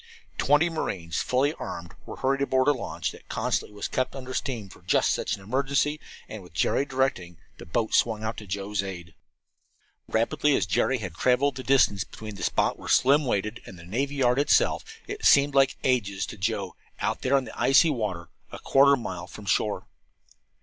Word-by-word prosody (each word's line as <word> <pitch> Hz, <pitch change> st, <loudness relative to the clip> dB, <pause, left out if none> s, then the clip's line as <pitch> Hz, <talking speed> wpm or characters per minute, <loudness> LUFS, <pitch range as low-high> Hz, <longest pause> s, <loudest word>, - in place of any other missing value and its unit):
Twenty 150 Hz, +4 st, +4 dB
marines, 90 Hz, -, -3 dB
fully 135 Hz, +4 st, +1 dB
armed, 85 Hz, -1 st, -7 dB
were -, -, -7 dB
hurried 135 Hz, +1 st, 0 dB
aboard 130 Hz, -1 st, +2 dB
a -, -, +7 dB
launch 130 Hz, -5 st, -3 dB
that -, -, -16 dB
constantly 105 Hz, -, -2 dB
was 105 Hz, -, -3 dB
kept 130 Hz, +1 st, -2 dB
under 130 Hz, -1 st, -7 dB
steam 120 Hz, -7 st, -3 dB
for 95 Hz, -, -16 dB
just 90 Hz, -, +2 dB
such -, -, -1 dB
an 95 Hz, -, -14 dB
emergency, 140 Hz, +6 st, 0 dB, 0.3 s
and, 110 Hz, -, -8 dB
with 90 Hz, -4 st, -16 dB
Jerry 140 Hz, -, +1 dB
directing, 130 Hz, -, -1 dB, 0.2 s
the -, -, -10 dB
boat 110 Hz, +6 st, -1 dB
swung 110 Hz, -2 st, +2 dB
out 110 Hz, +1 st, -2 dB
to 105 Hz, -, -9 dB
Joe's 100 Hz, +1 st, -2 dB
aid. 90 Hz, -4 st, -8 dB, 0.9 s
Rapidly 125 Hz, +6 st, +1 dB
as -, -, +1 dB
Jerry 135 Hz, -, +1 dB
had 95 Hz, -7 st, -6 dB
traveled 130 Hz, +8 st, +2 dB
the 130 Hz, -, -6 dB
distance 125 Hz, -8 st, +3 dB
between 110 Hz, +2 st, -9 dB
the 100 Hz, -, -10 dB
spot -, -, 0 dB
where -, -, -8 dB
Slim 140 Hz, +3 st, +4 dB
waited 110 Hz, -2 st, -2 dB
and 95 Hz, -, -10 dB
the 85 Hz, -, -12 dB
navy 135 Hz, +10 st, -2 dB
yard 125 Hz, -1 st, +2 dB
itself, 425 Hz, -, +3 dB, 0.2 s
it 415 Hz, +2 st, -7 dB
seemed 140 Hz, 0 st, +5 dB
like 135 Hz, -1 st, +3 dB
ages 100 Hz, -7 st, 0 dB
to -, -, -8 dB
Joe, 95 Hz, -2 st, -2 dB, 0.2 s
out -, -, -1 dB
there 135 Hz, +2 st, +3 dB
in 135 Hz, -, 0 dB
the -, -, -9 dB
icy 155 Hz, +4 st, +4 dB
water, 100 Hz, -, -3 dB, 0.2 s
a -, -, -7 dB
quarter 140 Hz, +1 st, +4 dB
of 140 Hz, -, +2 dB
a -, -, -8 dB
mile 90 Hz, 0 st, -5 dB
from 105 Hz, -, -11 dB
shore. 105 Hz, +1 st, 0 dB
125 Hz, 200 wpm, -26 LUFS, 100-135 Hz, 0.9 s, a